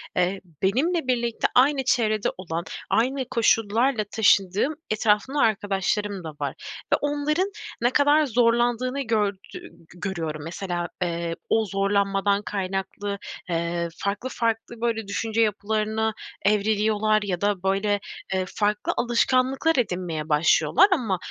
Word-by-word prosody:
eee, 180 +2 0 0.2
benimle 275 - +1
birlikte 235 -2 +1
aynı 270 +1 +4
çevrede 215 -5 +2
olan, 170 -2 -4 0.3
aynı 260 +3 +1
koşullarla 225 +1 +2
taşındığım 205 - +3 0.2
etrafımda 215 +6 +1
arkadaşlarım 205 -3 0
da 160 - -5
var - - -3 0.4
ve - - +5
onların 295 +6 0 0.3
ne 240 - +4
kadar 290 +2 +4
zorlandığını 240 +2 +1
gördü 215 -5 0 0.2
g 365 - -6 0.4
görüyorum. 165 -6 -4
Mesela, 175 +1 -3
eee, 170 -1 -2
o 220 0 +3
zorlanmadan 200 0 +1
kaynaklı, 200 0 -3 0.3
eee, 170 0 -1
farklı 205 +6 -3
farklı 230 -1 -2
böyle 225 -3 -1
düşünce 225 +2 -1
yapılarına 215 +1 0 0.3
evriliyorlar 215 +1 +2
ya 180 -4 -3
da 200 -2 0
böyle, 195 +1 +1 0.3
eee, 185 -1 0
farklı 210 0 0
alışkanlıklar 260 +5 +2
edinmeye 175 -8 -2
başlıyorlar 160 - +4
ama 235 - +1
215 Hz, 120 wpm, -24 LUFS, 195-240 Hz, 0.4 s, ve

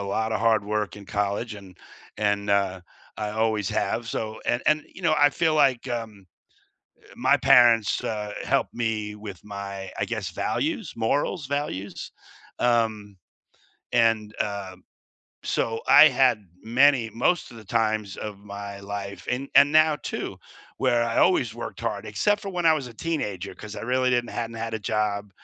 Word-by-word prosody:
lotta 110 +2 -1
hard 110 -2 +2
work 105 0 -2
in 100 - -11
college, 105 +3 -2
and 95 -3 -13 0.4
and, 105 -1 0
uh, 100 -2 +1 0.4
I 105 -1 -2
always 110 -2 0
have, 115 +4 -1
so 110 -1 -4
and - - +1
and, 155 0 +3
you 190 - -13
know, 165 -2 +3
I 145 - +6
feel 160 +2 +1
like, 135 -5 +3
um, 110 -5 -5 0.8
eh, - - -18
my - - +3
parents, 115 -3 +5
uh, 105 -1 -3
helped - - 0
me 110 -3 -2
with 105 -3 -9
my, 100 -2 -7
I - - +1
guess, 110 -6 -3
values, 225 - -2
morals, 140 +7 0
values, 140 -9 -4 0.5
um, 110 -4 0 0.8
and 110 -2 +2
uh, 100 -2 -3 0.7
so 115 0 -1
I - - +9
had 130 -4 +3 0.2
many 125 0 +3
most 125 +11 0
of 120 - -12
the 110 - -12
times 110 -2 0
of 105 -2 -6
my 100 0 -8
life, 100 -1 -6
and 130 +3 -2
and 145 - +8
now 155 -1 +5
too, - - -4 0.4
where 120 -2 +2
I 115 -1 -1
always 360 - +3
worked - - -7
hard, - - -3
except 205 0 +1
for 200 - -6
when 175 -2 -1
I 160 - +7
was 145 -4 -3
a 120 - -13
teenager 105 - -3
'cause 105 -1 -9
I - - -5
really 130 +2 +1
didn't 120 -1 0
hadn't 115 -1 -4
had 115 0 -4
a - - -1
job 105 -1 -1
110 Hz, 165 wpm, -25 LUFS, 100-125 Hz, 0.8 s, I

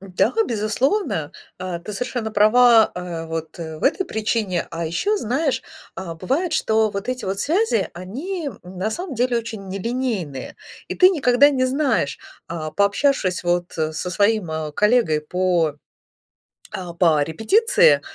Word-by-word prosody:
Да, 190 - 0
безусловно, 215 - -1 0.3
э, 185 -2 -4
ты 210 - -6
совершенно 240 0 -3
права, 225 +2 +5
э, 175 -2 -5
вот 160 -1 -5
в 160 -2 -7
этой 370 +7 +2
причине, 215 -5 -1
а 165 0 -4
ещё 405 - 0
знаешь, 270 - -1 0.3
а, 175 -3 -6
бывает, 280 - -1
что 220 -7 +2
вот 200 +4 -5
эти 255 0 -3
вот 195 +1 -2
связи, 320 - +1
они, 285 - -5
м, 180 +1 -11
на 215 +4 -1
самом 345 0 -5
деле 245 0 +1
очень 220 -4 -7
нелинейные, 195 - -3 0.3
и - - -3
ты 370 - +7
никогда 285 -5 +4
не 255 -2 +1
знаешь, 265 - 0 0.3
э, 170 - -3 0.2
пообщавшись 200 -2 +1
вот 175 0 0
со 160 +2 -3
своим 205 -1 +1 0.2
коллегой 210 -9 +2
по, 175 -2 +1 1.0
а, 175 -2 -6
по 165 -4 +3
репетиции, 435 - +3
210 Hz, 140 wpm, -21 LUFS, 175-255 Hz, 1.0 s, ты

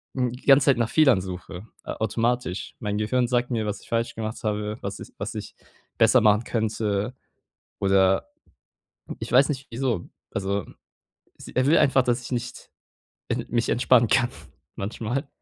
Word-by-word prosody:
hm, 125 -2 0
die 125 - -11
ganze 135 -1 +6
Zeit 140 -3 +4
nach 120 -1 0
Fehlern 135 -11 +4
suche 90 +2 -8 0.2
automatisch. 115 -2 -2
Mein 105 -1 -2
Gehirn 120 +4 +1
sagt 120 +1 0
mir, 110 -3 -1
was 105 -1 -4
ich - - -18
falsch 115 0 -1
gemacht 110 +1 -5
habe, 105 0 -2
was - - -5
ich - - -9
was - - -4
ich - - -7 0.4
besser 115 +2 +6
machen 105 +1 +4
könnte 110 0 -1 0.6
oder 95 0 +3 0.9
ich - - -6
weiß 135 +4 +5
nicht, 135 -2 -3
wieso. 115 -6 -2 0.2
Also, 100 0 -2 0.7
s - - -11
er 130 - +1
will 160 +3 +5
einfach, 135 -1 +4
dass 120 0 0
ich 120 - -9
nicht, 120 0 -5 0.6
äh, - - -1
mich 120 0 0
entspannen 120 -1 +4
kann 120 +3 +3 0.4
manchmal. 115 +7 -3
115 Hz, 165 wpm, -25 LUFS, 105-125 Hz, 0.9 s, ganze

